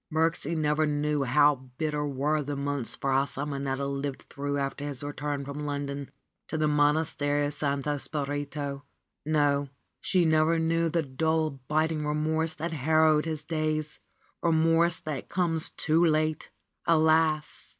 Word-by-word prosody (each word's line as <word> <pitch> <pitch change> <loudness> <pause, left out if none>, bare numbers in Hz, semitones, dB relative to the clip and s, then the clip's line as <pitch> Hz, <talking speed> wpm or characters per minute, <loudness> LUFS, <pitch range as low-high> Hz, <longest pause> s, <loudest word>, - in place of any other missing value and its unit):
Birksie 165 0 0
never 155 0 +2
knew 150 -1 0
how 145 +3 +5 0.2
bitter 150 -2 -1
were 145 +3 0
the 145 0 -4
months 140 -4 -2
Fra 135 0 +1
Simonetta 140 -1 -2
lived 140 0 -3
through 145 0 -2
after 140 +1 -3
his 145 -1 -5
return 145 -1 -3
from 140 +1 -6
London 140 -1 -4 0.4
to 160 - -3
the 155 -1 +2
Monastery 145 -1 +2
of 145 - -2
Santo 145 0 -1
Spirito. 145 -1 -4 0.4
No, 145 -2 +2 0.3
she 180 -3 +2
never 160 +1 +3
knew 165 +1 +1
the 165 0 0
dull, 160 +3 0 0.2
biting 155 0 +1
remorse 155 +2 0
that 165 +3 -4
harrowed 155 +1 +3
his 155 -2 -3
days, 155 -1 -2 0.4
remorse 165 0 +3
that 150 -5 -5
comes 170 -3 +2
too 165 +2 +1
late! 155 -1 +1 0.4
Alas! 160 -1 +2
150 Hz, 140 wpm, -28 LUFS, 145-160 Hz, 0.4 s, how